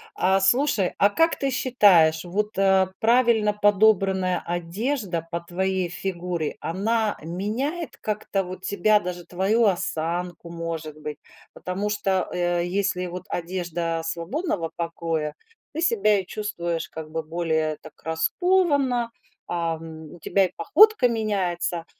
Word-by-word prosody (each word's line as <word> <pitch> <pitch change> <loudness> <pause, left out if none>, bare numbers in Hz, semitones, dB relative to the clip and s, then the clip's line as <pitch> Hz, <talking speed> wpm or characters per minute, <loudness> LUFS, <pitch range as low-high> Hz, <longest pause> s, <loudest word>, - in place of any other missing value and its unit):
А, 190 +1 +3
слушай, 205 -1 +2
а 200 - +5
как 330 +10 +2
ты 275 - -1
считаешь, 190 -12 +4
вот, 210 +4 -2
э, 190 -1 +4
правильно 230 -2 +3
подобранная 195 -3 +3
одежда 175 - -2
по 170 0 -2
твоей 185 +1 -1
фигуре, 175 -2 -3
она 215 +5 0
меняет 220 - -3
как-то 210 -2 -2
вот 185 0 -8
тебя, 210 +2 +3
даже 175 -2 -6
твою 200 +6 +1
осанку, 175 -2 -2
может 165 -2 -5
быть? 150 0 -6 0.4
Потому 195 +3 -3
что, 195 -3 0
э, 175 -1 0
если 185 0 -1
вот 180 +1 -6
одежда 170 -2 -2
свободного 170 - -2
покроя, 165 -3 -3 0.4
ты 320 - -3
себя 335 - +3
чувствуешь 175 -5 -3
как 160 -1 -8
бы 160 0 -3
более 160 -1 -1
так 155 - -12
раскованно, 265 - +1 0.4
ам, 160 -2 -4
у 175 - -13
тебя 195 +4 +2
и 180 - -5
походка 415 - +5
меняется! 190 -7 -1
185 Hz, 125 wpm, -24 LUFS, 170-210 Hz, 0.4 s, а